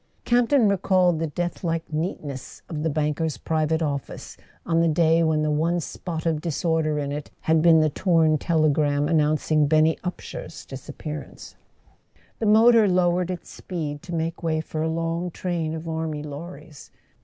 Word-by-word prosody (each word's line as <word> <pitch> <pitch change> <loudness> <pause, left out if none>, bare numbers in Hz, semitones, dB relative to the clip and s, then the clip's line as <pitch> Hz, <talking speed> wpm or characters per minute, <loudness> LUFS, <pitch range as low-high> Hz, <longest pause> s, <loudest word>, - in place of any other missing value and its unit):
Camp 240 -1 +3
ton 270 -7 +4
recalled 185 -3 +2
the 165 - -1
deathlike 165 +1 -2
neatness 150 -5 -5
of 155 -3 -5
the 160 - 0
banker's 150 +1 -1
private 160 0 0
office 140 -3 -4 0.3
on 165 -1 +1
the 165 - +3
day 165 +1 +3
when 160 -2 +2
the 155 - +1
one 165 +4 +1
spot 165 0 -5
of 160 -2 0
disorder 160 -1 0
in 140 -1 -2
it 145 0 -5
had 160 0 +2
been 165 -1 +6
the 155 - +3
torn 160 -3 +2
telegram 150 -3 +2
announcing 155 -1 +2
Benny 155 +1 +3
Upsher's 175 -2 -7
disappearance. 145 +2 -8 0.9
The 220 - 0
motor 220 +1 +6
lowered 180 -1 +2
its 180 -1 -6
speed 150 -5 -5
to 175 -1 -6
make 165 +1 -3
way 160 -2 0
for 155 0 -4
a 160 - 0
long 165 +2 -2
train 165 -2 -3
of 160 +1 -7
army 160 -2 -3
lorries. 150 0 -9
160 Hz, 160 wpm, -24 LUFS, 155-175 Hz, 0.9 s, been